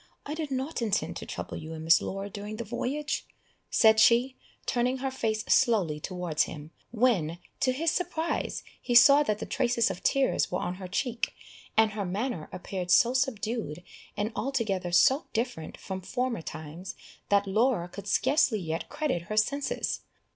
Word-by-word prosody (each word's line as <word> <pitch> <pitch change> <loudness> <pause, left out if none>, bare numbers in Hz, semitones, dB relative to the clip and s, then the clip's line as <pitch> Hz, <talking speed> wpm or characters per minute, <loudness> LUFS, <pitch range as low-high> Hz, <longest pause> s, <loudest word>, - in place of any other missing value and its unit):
I 290 - -4
did 310 -2 -4
not 265 +1 -3
intend 215 -2 0
to - - -8
trouble - - -5
you 160 +1 -7
and 160 0 -7
Miss 165 +1 +6
Laura 195 +1 -4
during 205 +1 -6
the 235 - -4
voyage," 295 +6 -2 0.5
said 220 -2 +5
she, 240 +4 +5 0.3
turning 250 +1 +1
her 265 0 -2
face 220 -4 -1
slowly 200 - +3
towards 180 -2 -1
him, 150 0 -9 0.2
when, 215 -9 +1 0.2
to 255 - +2
his 315 +5 +1
surprise, 340 -2 -2 0.2
he 240 - -1
saw 280 +4 +9
that 215 -8 0
the - - -5
traces 240 -5 +1
of 180 0 -7
tears 275 +6 +2
were 180 - 0
on 180 - -2
her 185 - -5
cheek, 235 +5 -2 0.4
and 220 -1 +5
her 210 -1 -3
manner 190 -2 -3
appeared 180 0 -5
so 235 +7 +5
subdued, 225 - -2 0.3
and 210 +2 -1
altogether 215 -10 -1
so 260 - +4
different 230 -8 -3
from 190 -1 -6
former 250 +1 -2
times, 160 +3 -7 0.3
that 200 0 +4
Laura 215 -2 +1
could 200 +3 -9
scarcely 280 -1 +3
yet 165 -3 -4
credit 300 - -1
her 215 - -2
senses. 280 +6 0
220 Hz, 170 wpm, -28 LUFS, 180-260 Hz, 0.5 s, saw